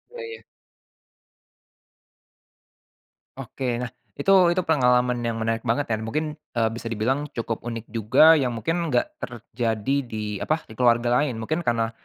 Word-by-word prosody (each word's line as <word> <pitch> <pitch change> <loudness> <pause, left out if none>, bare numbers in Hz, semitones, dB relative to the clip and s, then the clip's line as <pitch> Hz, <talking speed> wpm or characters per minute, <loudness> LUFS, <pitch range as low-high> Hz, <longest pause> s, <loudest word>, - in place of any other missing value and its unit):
Oh - - -8
iya. 455 0 -8 3.0
Oke 135 - -7 0.2
nah 125 - -4 0.2
itu - - -1 0.2
itu 185 - +1
pengalaman 125 -5 +2
yang 115 - -1
menarik 115 +1 -2
banget 120 +3 0
dan 110 0 -1
mungkin, 155 +5 -3 0.2
eee, 115 -2 +2
bisa 115 +1 -7
dibilang 120 +6 -1
cukup 115 0 -4
unik 115 -2 -6
juga 125 +9 +5
yang 125 -4 0
mungkin 165 +10 -1
enggak 305 - +1
terjadi 115 0 -3
di 105 -3 -4
apa 155 +8 -1
di 110 - -12
keluarga 120 0 +3
lain 145 -4 0
mungkin 155 +9 -2
karena, 115 -1 +1
120 Hz, 145 wpm, -24 LUFS, 115-150 Hz, 3.0 s, juga